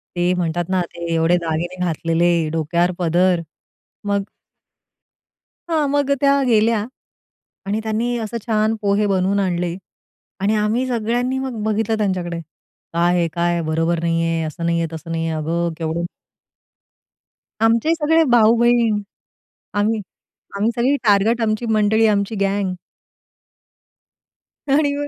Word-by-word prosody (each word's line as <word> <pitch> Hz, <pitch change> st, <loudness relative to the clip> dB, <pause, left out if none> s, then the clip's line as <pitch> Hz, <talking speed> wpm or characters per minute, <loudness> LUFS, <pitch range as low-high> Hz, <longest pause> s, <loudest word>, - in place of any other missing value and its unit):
ते 175 Hz, +1 st, +1 dB
म्हणतात 175 Hz, -1 st, -1 dB
ना, 185 Hz, -1 st, +1 dB
ते 170 Hz, 0 st, -7 dB
एवढे 165 Hz, +1 st, +3 dB
दागिने 170 Hz, +1 st, -3 dB
घातलेले, 165 Hz, 0 st, +1 dB
डोक्यावर 170 Hz, +3 st, +1 dB
पदर. 175 Hz, +1 st, +2 dB, 0.6 s
मग 200 Hz, -1 st, 0 dB, 1.5 s
हां. 310 Hz, -3 st, +1 dB
मग 285 Hz, 0 st, +1 dB
अ, -, -, +6 dB
त्या 280 Hz, 0 st, +4 dB
गेल्या. 220 Hz, -2 st, +3 dB, 0.8 s
आणि 205 Hz, +2 st, -1 dB
त्यांनी 225 Hz, +2 st, -1 dB
असं 225 Hz, +1 st, -4 dB
छान 220 Hz, -1 st, +1 dB
पोहे 205 Hz, 0 st, +2 dB
बनवून 195 Hz, +1 st, +1 dB
आणले 175 Hz, -2 st, -1 dB, 0.7 s
आणि 205 Hz, +3 st, +1 dB
आम्ही 215 Hz, +5 st, 0 dB
सगळ्यांनी 245 Hz, +2 st, -1 dB
मग 260 Hz, -5 st, -4 dB
बघितलं 220 Hz, +1 st, 0 dB
त्यांच्याकडे. 180 Hz, -5 st, -1 dB, 0.5 s
"काय 175 Hz, +1 st, +2 dB
हे 170 Hz, -, +2 dB
काय? 175 Hz, 0 st, +1 dB
बरोबर 165 Hz, +2 st, 0 dB
नाहीये. 165 Hz, 0 st, 0 dB
असं 165 Hz, +2 st, -4 dB
नाहीये, 170 Hz, 0 st, +1 dB
तसं 160 Hz, +1 st, -8 dB
नाहीये. 165 Hz, 0 st, -1 dB
अगं 165 Hz, +2 st, -1 dB
केवढं?" 165 Hz, +1 st, -2 dB, 1.6 s
आमचे 230 Hz, +8 st, +3 dB
सगळे 320 Hz, 0 st, +3 dB
भाऊ-बहीण 235 Hz, -1 st, +4 dB, 0.8 s
आम्ही, 215 Hz, +2 st, +1 dB, 0.6 s
आम्ही 210 Hz, +3 st, +1 dB
सगळी 255 Hz, +4 st, +2 dB
टार्गट, 215 Hz, +2 st, +3 dB
आमची 215 Hz, +1 st, 0 dB
मंडळी 215 Hz, +1 st, +3 dB
आमची 205 Hz, 0 st, 0 dB
गँग. 195 Hz, -1 st, 0 dB, 1.9 s
आणि 285 Hz, +1 st, +2 dB
मग. 290 Hz, 0 st, -3 dB
200 Hz, 125 wpm, -20 LUFS, 170-225 Hz, 1.9 s, अ